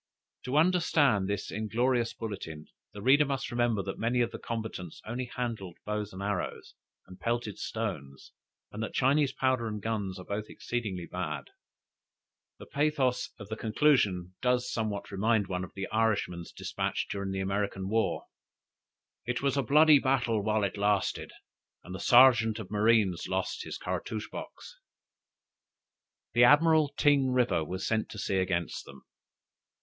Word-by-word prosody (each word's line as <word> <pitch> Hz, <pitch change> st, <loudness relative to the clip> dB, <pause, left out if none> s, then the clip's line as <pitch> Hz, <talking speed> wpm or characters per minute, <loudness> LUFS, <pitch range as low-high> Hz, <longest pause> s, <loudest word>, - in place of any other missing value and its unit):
To 130 Hz, +3 st, 0 dB
understand 150 Hz, -, +3 dB
this 100 Hz, -, -3 dB
inglorious 115 Hz, +3 st, 0 dB
bulletin, 95 Hz, -9 st, -6 dB, 0.3 s
the 100 Hz, -, -9 dB
reader 140 Hz, +4 st, +6 dB
must 135 Hz, -2 st, -3 dB
remember 120 Hz, -4 st, +1 dB
that 95 Hz, -, -5 dB
many 120 Hz, +2 st, +1 dB
of 120 Hz, 0 st, 0 dB
the -, -, -7 dB
combatants 110 Hz, -7 st, -5 dB
only 120 Hz, +3 st, -3 dB
handled 115 Hz, -8 st, -5 dB
bows 105 Hz, 0 st, -3 dB
and 95 Hz, +1 st, -7 dB
arrows, 100 Hz, -3 st, -3 dB, 0.3 s
and 90 Hz, 0 st, -13 dB
pelted 115 Hz, 0 st, -2 dB
stones, 75 Hz, -12 st, -5 dB, 0.4 s
and 105 Hz, -, -6 dB
that 110 Hz, -, -4 dB
Chinese 140 Hz, +2 st, +3 dB
powder 130 Hz, -3 st, 0 dB
and 105 Hz, -1 st, -4 dB
guns 100 Hz, -3 st, -3 dB
are 90 Hz, -, -9 dB
both 105 Hz, +1 st, -3 dB
exceedingly 105 Hz, -8 st, -4 dB
bad. 75 Hz, -6 st, -5 dB, 1.1 s
The -, -, -11 dB
pathos 140 Hz, -4 st, 0 dB
of 100 Hz, -2 st, -10 dB
the 110 Hz, -, -3 dB
conclusion 105 Hz, -7 st, +2 dB
does 125 Hz, 0 st, +1 dB
somewhat 105 Hz, -3 st, -3 dB
remind 105 Hz, +2 st, +2 dB
one 90 Hz, -1 st, -3 dB
of 90 Hz, -, -10 dB
the 95 Hz, 0 st, -3 dB
Irishman's 105 Hz, -6 st, 0 dB
despatch -, -, -3 dB
during 100 Hz, -1 st, -4 dB
the 95 Hz, 0 st, -3 dB
American 100 Hz, 0 st, -2 dB
war, 110 Hz, +2 st, 0 dB, 1.0 s
"It 125 Hz, +2 st, -2 dB
was 140 Hz, -1 st, +2 dB
a 140 Hz, -, +2 dB
bloody 150 Hz, +3 st, +6 dB
battle 125 Hz, -5 st, +1 dB
while 105 Hz, 0 st, +1 dB
it 100 Hz, 0 st, -2 dB
lasted; 100 Hz, -1 st, 0 dB, 0.5 s
and 90 Hz, -, -9 dB
the 95 Hz, -, -6 dB
searjent 120 Hz, -3 st, +6 dB
of 105 Hz, -4 st, -8 dB
marines 105 Hz, -4 st, +2 dB
lost -, -, -2 dB
his -, -, -5 dB
cartouche 110 Hz, -1 st, -4 dB
box." -, -, -9 dB, 1.5 s
The 120 Hz, -, +5 dB
Admiral 155 Hz, +2 st, +5 dB
Ting 140 Hz, -3 st, +4 dB
River 125 Hz, -10 st, +2 dB
was 95 Hz, +4 st, -4 dB
sent 110 Hz, -1 st, 0 dB
to -, -, -9 dB
sea 100 Hz, -1 st, -1 dB
against 90 Hz, -2 st, -1 dB
them. 70 Hz, -1 st, -14 dB
110 Hz, 155 wpm, -29 LUFS, 95-125 Hz, 1.5 s, reader